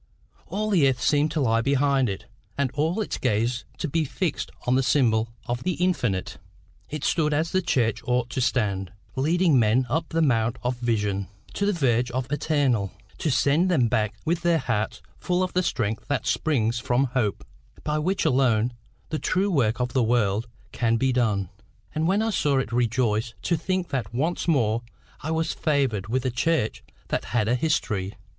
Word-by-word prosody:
All 215 +2 -2
the 155 -9 +5
earth 130 -2 -1
seemed 145 +3 +2
to 155 -1 -1
lie 115 -3 +2
behind 140 -1 +2
it, 95 - -5 0.3
and 140 -3 0
all 160 +8 0
its 210 - -3
gaze 115 +3 0
to - - -2
be 160 +2 0
fixed 160 +4 -2 0.2
on 125 - +2
the 130 - +4
symbol 115 -5 +2 0.2
of 120 0 -2
the 185 - 0
infinite. 140 - -1 0.5
It 150 -1 -5
stood 150 -3 +1
as 160 +2 0
the 185 - +2
church 115 - +1
ought 125 0 0
to 130 - -1
stand, 100 -7 0 0.2
leading 160 +1 +3
men 115 +3 +3
up 160 +2 0
the 165 0 +1
mount 115 -4 +2
of 125 +1 0
vision, 105 -5 -1 0.3
to 200 - 0
the - - +3
verge 125 - +1
of 130 +1 -3
the - - -2
eternal, 135 - +1 0.3
to 160 - 0
send 145 +7 +3
them 130 -10 +3
back 110 -2 0
with 170 +1 0
their 170 -1 +3
hearts 110 -7 -2 0.2
full 180 +1 0
of 185 - -3
the 180 - +3
strength 110 - -2
that 140 -6 -1
springs 120 -7 +1
from 125 +1 +1
hope, 105 - 0 0.4
by 150 0 0
which 185 +5 0
alone 125 -5 +2 0.4
the 155 - -2
true 195 +2 +1
work 120 -8 +1
of 125 0 -1
the 130 - +3
world 110 -1 +1 0.2
can 115 -1 +1
be 130 +1 +1
done. 105 -7 +1 0.4
And 155 +1 0
when 200 +4 +2
I 225 - 0
saw 145 -7 +1
it 135 - 0
I - - -2
rejoiced 115 -1 +1
to 170 - +1
think 185 +2 -2
that 130 -3 -3
once 160 +9 -1
more 115 -8 +2 0.4
I 150 - -4
was 160 0 0
favoured 135 - 0
with 130 +3 -1
a 130 - +1
church 125 -1 0 0.3
that - - -1
had 110 -3 0
a 120 - +2
history. 115 - 0
130 Hz, 190 wpm, -25 LUFS, 115-160 Hz, 0.5 s, the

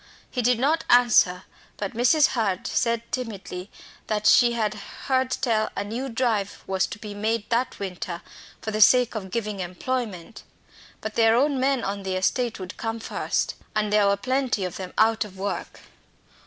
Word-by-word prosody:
He 250 - -1
did 245 0 +3
not 300 +7 +1
answer, 225 -7 +5 0.3
but 200 -2 -4
Mrs. 255 +6 +4
Hurd 200 -6 -1
said 235 -1 0
timidly 200 -6 -5 0.4
that 210 -1 -1
she 240 +2 +6
heard 235 +4 -1
tell 220 -4 +1
a 200 - 0
new 235 +6 -4
drive 225 -5 -1
was 190 0 0
to - - -7
be 210 -1 -8
made 215 +1 -1
that 240 +2 0
winter 180 -3 -5 0.4
for 220 - -3
the 215 0 -1
sake 250 +3 +6
of 200 -4 -5
giving 210 -1 -3
employment. 195 +2 -4 0.6
But 220 - -4
their 225 0 +4
own 275 +2 +2
men 265 -1 +1
on 200 +1 -3
the 190 -1 -3
estate 230 +5 0
would 185 -1 -7
come 225 0 -3
first, - - -1 0.2
and 210 -1 0
there 210 -1 +5
were 200 0 +3
plenty 255 -3 0
of 180 - -5
them 185 -1 -6
out 225 +1 +4
of 195 -3 -12
work. 200 +1 -4
220 Hz, 170 wpm, -25 LUFS, 200-245 Hz, 0.6 s, she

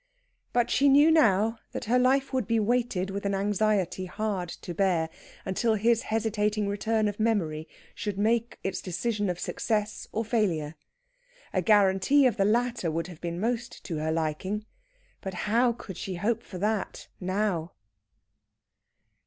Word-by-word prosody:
But 240 0 +1
she 280 +1 +4
knew 290 +4 +6
now 225 -6 +3
that - - -4
her 245 +3 +3
life 265 +2 +2
would 255 -6 0
be 230 -1 +2
weighted 215 -4 0
with 200 +1 -4
an 200 -1 0
anxiety 200 -2 0
hard 195 -3 -2
to 175 - -7
bear, 170 -3 +1 0.3
until 220 +4 +1
his 230 +2 +3
hesitating 215 -1 0
return 215 +2 0
of 205 0 -4
memory 170 -9 0 0.3
should 205 -2 -4
make 230 +3 +1
its 190 -1 -2
decision 205 +2 -1
of 180 -1 -3
success 215 -1 -2
or 225 +1 -2
failure. 180 -10 0 0.8
A 185 - +2
guarantee 205 +8 +4
of 240 -4 +2
the 195 - +3
latter 235 -3 +1
would 165 +1 -2
have 175 -4 -11
been 170 0 -3
most 235 +2 -2
to 165 - -4
her 155 +1 -1
liking, 165 +7 -2 0.6
but 190 -1 -5
how 235 +3 +3
could 215 -6 -8
she 185 0 -4
hope 210 +6 0
for 185 - -9
that 210 +2 -2
now? 185 -3 -1
210 Hz, 155 wpm, -28 LUFS, 185-230 Hz, 0.8 s, knew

